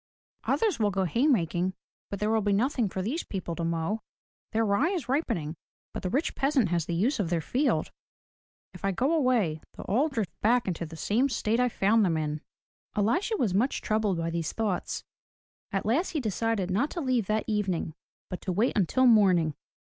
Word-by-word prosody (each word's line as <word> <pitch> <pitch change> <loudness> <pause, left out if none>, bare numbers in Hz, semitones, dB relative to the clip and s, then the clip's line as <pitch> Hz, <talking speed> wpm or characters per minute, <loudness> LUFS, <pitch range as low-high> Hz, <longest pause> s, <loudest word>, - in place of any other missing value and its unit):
"Others 435 - +1
will 210 -2 +3
go 195 -1 0
hay 235 - +1
making, 180 - +1 0.3
but 200 - -4
there 210 +1 +1
will 225 -1 +2
be 205 0 +1
nothing 235 +1 +1
for 185 0 -3
these 275 - -1
people 180 -4 -4
to 170 - -3
mow. 165 +6 -1 0.5
Their 225 +1 +1
rye 210 +11 +2
is 360 -9 -3
ripening, 230 - -1 0.4
but - - -4
the 185 - -2
rich 280 - 0
peasant 270 - +2
has 170 -2 0
the 170 - -1
use 230 - +1
of 185 -5 0
their 170 -1 +1
field. 260 - 0 0.8
If - - -12
I 195 - +2
go 265 - +1
away, 240 - +2 0.2
they'll - - -6
all 265 +11 +2
drift 225 - -2
back 240 +2 +3
into 170 -2 -2
the 160 - -10
same 230 - +1
state 230 -1 0
I 250 0 +3
found 220 +1 +3
them 170 -4 +2
in." 150 -1 -2 0.5
Elisha 345 - +1
was 220 - +1
much 235 +8 +1
troubled 215 -4 0
by 165 0 -2
these 165 -2 -2
thoughts. 215 -5 -2 0.7
At 195 -2 -1
last 280 - +1
he 310 - 0
decided 220 -4 -1
not 245 +11 +1
to 350 - -5
leave 255 - 0
that 215 0 +1
evening 195 -7 -1 0.3
but 180 - -6
to 185 - -2
wait 210 +8 +1
until 215 +7 +3
morning. 185 -9 +5
210 Hz, 200 wpm, -28 LUFS, 180-250 Hz, 0.8 s, morning